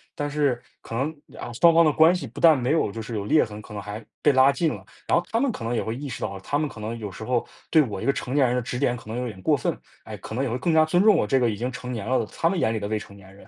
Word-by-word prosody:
但 145 0 -2
是 145 -5 0 0.2
可 - - -10
能， 140 +7 -1 0.2
啊， - - -6
双 170 -1 +7
方 165 0 +6
的 150 - +3
关 160 +2 +6
系 165 -8 -4
不 110 - -10
但 160 -3 +7
没 125 +3 0
有 160 -10 +1
就 115 - -6
是 115 +1 -6
有 100 - -2
裂 150 +9 +4
痕， 105 -1 -4
可 105 - -12
能 105 - -5
还 105 +2 -7 0.2
被 145 - +4
拉 130 +1 +6
近 165 +4 0
了。 - - -10 0.2
然 - - +3
后 175 - -1
他 230 - +1
们 275 +1 +2
可 210 - -5
能 115 +1 -2
也 120 - 0
会 110 - -3
意 140 +2 -6
识 - - -7
到， 95 - -3
他 140 - -1
们 150 0 0
可 130 - -12
能 115 +2 -4
有 105 -2 -5
时 95 - -9
候， 120 +1 -1 0.2
对 160 - +6
我 100 -6 -5
一 - - -4
个 140 - +4
成 130 -1 -5
年 145 -2 +4
人 125 - +1
的 125 - 0
指 125 +2 -4
点 125 -2 +1
可 115 - -14
能 115 - -4
有 125 0 -2
点 95 -4 -9
过 - - +3
分。 - - -1 0.3
唉， - - -8
可 110 - -8
能 130 - 0
也 130 - -1
会 120 - -2
更 165 +6 0
加 160 0 +6
尊 175 +3 +2
重 215 -2 +6
我 - - +2
这 135 - +2
个 120 -2 +2
已 105 - -2
经 125 +4 -3
成 125 0 -7
年 110 -3 -5
了 130 +2 +1
的， 115 - -1
他 165 - +2
们 190 - -1
眼 110 - +1
里 110 - -3
的 100 - -3
未 110 0 -1
成 100 - -12
年 95 -1 -16
人。 100 - -17
125 Hz, 390 characters per minute, -24 LUFS, 110-150 Hz, 0.3 s, 双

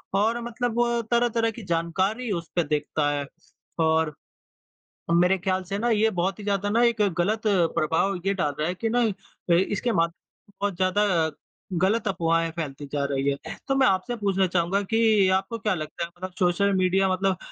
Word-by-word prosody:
और 225 +4 +1
मतलब 235 0 -3
वो 235 0 +2
तरह-तरह 235 -1 +2
की 225 0 -10
जानकारी 190 +7 -1
उस 170 -4 -3
पे 175 - +3
देखता 150 0 -1
है। 145 -1 -2 0.6
और 160 -1 +1 1.0
मेरे 180 +3 +4
ख़्याल 185 +1 -1
से 195 +2 -4
ना 240 +2 0
ये 220 -1 +3
बहुत 190 0 -2
ही - - -7
ज़्यादा 200 0 0
ना 230 +3 +3
एक 235 -2 +2 0.2
ग़लत 210 +5 +1
प्रभाव 175 -1 +1
ये 195 - +2
डाल 150 -7 -1
रहा 155 - 0
है 180 - -2
कि 225 +5 -2
ना 245 +2 +2 0.5
ए, - - +6
इसके 205 +5 0
माध 170 -4 +2 0.5
बहुत 200 -2 0
ज़्यादा 190 +3 +2 0.7
ग़लत 210 +4 +2
अफ़वाहें 165 -3 +1
फैलती 145 -4 -5
जा 145 -1 -1
रही 135 0 0
है। - - -7
तो 270 - +1
मैं 270 -1 +4
आपसे 195 +6 0
पूछना 195 -3 +1
चाहूँगा 180 +2 +1
कि 220 -1 +3
आपको 195 +4 -4
क्या 210 0 0
लगता 155 +1 -5
है? - - -11
मतलब 185 +1 -6
सोशल 185 +3 +2
मीडिया 190 +1 +2
मतलब 190 0 0
190 Hz, 185 wpm, -25 LUFS, 170-220 Hz, 1.0 s, ए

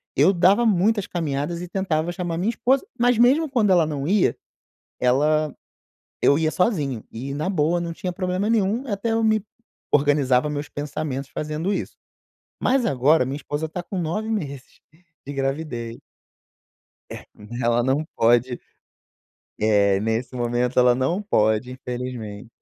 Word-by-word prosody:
Eu 160 +8 +5
dava 195 +6 +4
muitas 205 0 +2
caminhadas 165 0 -3
e 180 - -6
tentava 175 -3 -1
chamar 175 -2 -3
minha 200 +5 0
esposa, 260 +3 +1 0.2
mas 245 -1 +3
mesmo 275 +7 +4
quando 235 -6 +2
ela 170 -3 +5
não 145 -2 -3
ia, 200 +1 +2 0.6
ela, 150 +4 +2 0.7
eu 140 - +5
ia 155 0 +1
sozinho. 150 - 0
E 130 +5 -6
na 155 +6 -2
boa 170 -1 +1
não 170 -1 -4
tinha 180 +2 -4
problema 185 +3 -2
nenhum 225 +3 +1
e 225 - -4
até 200 +3 -1
eu 225 0 +1
me 215 -1 +3 0.5
organizava 145 -1 +3
meus 145 0 -4
pensamentos 145 -2 -4
fazendo 155 +6 -2
isso. - - -4 0.7
Mas 255 -2 +2
agora 140 - +3
minha 135 +2 -4
esposa 150 +1 -4
está 175 +3 -5
com 190 +2 -6
9 195 +7 -2
meses 140 -11 -5 0.5
de 145 - -6
gravidez. 135 -4 -3 1.1
É - - -8 0.4
ela 120 0 +2
não 135 +4 +1
pode, 120 +2 +2 1.0
eh, 100 -2 +3
nesse 115 +4 -2
momento 120 +1 0
ela 125 -1 +6
não 135 +10 0
pode 110 - +1
infelizmente. 120 -4 -6
150 Hz, 150 wpm, -23 LUFS, 130-190 Hz, 1.1 s, ela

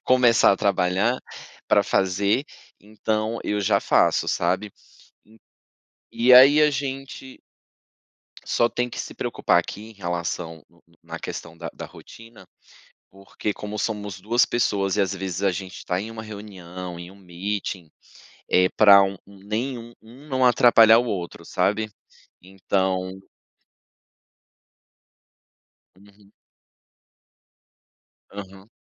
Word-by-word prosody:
começar 125 -2 +4
a 100 - 0
trabalhar 100 +5 +1 0.5
pra - - +4
fazer, 100 +7 +1 0.4
então 110 +2 -3
eu 105 0 -1
já 95 - +2
faço, - - +2
sabe, 95 +4 -1 1.4
e 125 +2 +3
aí 140 +4 +8
a 150 - +4
gente 135 -1 -6 1.1
Só 120 - +2
tem 125 0 -2
que - - -8
se - - -6
preocupar - - +1
aqui 105 - -7
em - - -17
relação 85 -3 -5 0.4
na - - -7
questão 85 0 -8
da 80 0 -6
da - - -8
rotina, 115 -4 -15 0.7
porque 100 +2 -5
como 105 0 -7
somos 105 -3 -4
2 115 +4 +2
pessoas 100 -5 0
e - - +2
às 100 0 -2
vezes 95 0 -5
a 100 - +3
gente 90 0 -8
tá 90 - -1
em 110 +3 -7
uma 110 -1 -8
reunião, 90 -4 -9
em 85 +1 -9
um 100 - -16
meeting, 95 -1 -5 0.6
é 90 0 +4
pra 100 -2 +7
um 95 0 -2
nem 105 +6 -4
um 115 +1 -11
um 125 +7 -16
não 130 -1 +1
atrapalhar 115 -2 +6
o 125 - -2
outro, 85 -4 -5
sabe, 105 +4 -1 0.5
então 95 0 -2 2.9
Uhum. 100 +1 -22 2.0
Aham. 100 +1 -11
100 Hz, 120 wpm, -23 LUFS, 95-115 Hz, 2.9 s, aí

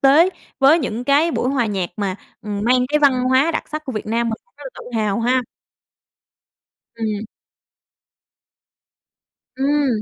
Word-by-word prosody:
tế 290 +6 +6 0.3
với 280 +4 +6
những 245 -5 -3
cái 290 +5 +3
buổi 255 - -1
hòa 260 -4 +1
nhạc 195 -4 -2
mà, 200 -3 -2 0.3
ừm, 205 -1 -4
mang 250 +1 +3
cái 300 +2 +2
văn 260 -4 +3
hóa 260 +5 +3
đặc 320 - -3
sắc 310 0 -5
của 265 - -5
Việt 215 -2 -5
Nam 230 +2 0
mình, 225 - -2
cũng 480 - -40
rất - - -11
là - - -6
tự 235 -2 -6
hào 210 +1 0
ha. 250 +2 +2 1.5
Ừm. 220 -2 -3 2.3
Ừm. 285 +2 +1
255 Hz, 160 wpm, -20 LUFS, 220-285 Hz, 2.3 s, tế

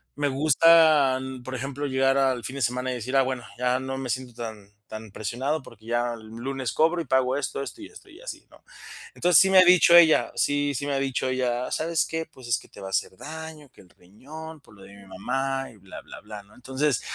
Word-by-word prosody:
me 145 0 0
gusta, 150 -1 +5 0.3
por 130 - -6
ejemplo, 135 +3 -4
llegar 135 0 +2
al 130 -3 +1
fin 130 - -6
de - - -4
semana 125 +2 -1
y - - -3
decir: 125 +3 -4
"Ah, 135 - +6
bueno, 130 -2 -4
ya 125 +1 +1
no 135 0 -5
me 130 -2 -5
siento 125 +1 -4
tan 110 -4 -9 0.2
tan 110 -1 -9
presionado 130 +10 -3
porque 110 -4 -16
ya 120 +1 -1
el 110 -1 -13
lunes 125 +2 -4
cobro 165 +3 +2
y - - -6
pago 130 0 +1
esto, 140 0 -3
esto 140 - -9
y 315 - -8
esto 420 -2 -16
y 350 +1 -15
así", - - -9
¿no? - - -19 0.5
Entonces 175 -2 +5
sí 190 - +4
me 190 -1 +7
ha - - +9
dicho 180 -1 +6
ella, 165 -2 +6
sí 145 0 0
sí 140 - -3
me - - -1
ha 135 - 0
dicho 135 -1 -1
ella: 125 -1 -1
"¿Sabes 165 0 0
qué?, 160 0 -4
pues 130 -7 -14
es 120 - +3
que - - -17
te - - -14
va 95 - -7
a - - -6
hacer 95 - -1
daño, 160 0 -9
que - - -23
el 90 - -21
riñón 150 - -12
por 125 - -19
lo 100 - -17
de - - -14
mi 100 -1 -15
mamá 135 +8 -3
y 110 - -18
bla, 95 -1 -11
bla, - - -12
bla", 105 -1 -10
¿no?, 100 - -23
entonces, 130 0 -1
130 Hz, 245 wpm, -25 LUFS, 120-150 Hz, 0.5 s, ha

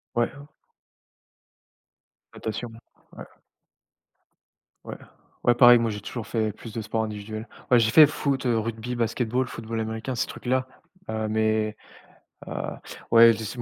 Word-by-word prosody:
Ouais. 120 0 +1 2.0
Natation, 115 +2 -5 0.4
ouais. - - -9 1.6
Ouais. - - -7 0.5
Ouais, 120 -1 +4
pareil, 120 -1 +8
moi, 115 -1 0
j'ai 105 -1 -5
toujours 115 +2 -6
fait 110 -2 -1
plus 110 +2 -11
de 115 - -3
sport 110 +1 -2
individuel. 110 +1 -6 0.2
Ouais 125 - +7
j'ai 110 -1 +2
fait 155 +6 +9
foot, 140 -2 -2
heu, 120 -2 +2
rugby, 115 +2 -4
basketball, 120 +2 -1
football 115 -1 -5
américain, 110 +3 -4
ces - - -1
trucs-là. 130 +1 -2 0.4
Heu, 110 0 -2
mais 110 0 0 0.7
heu, - - -8 0.6
ouais, 115 0 +8
je - - -6
dis 110 - -5
ce 105 - -7
ouais - - -4
115 Hz, 145 wpm, -25 LUFS, 110-120 Hz, 2.0 s, fait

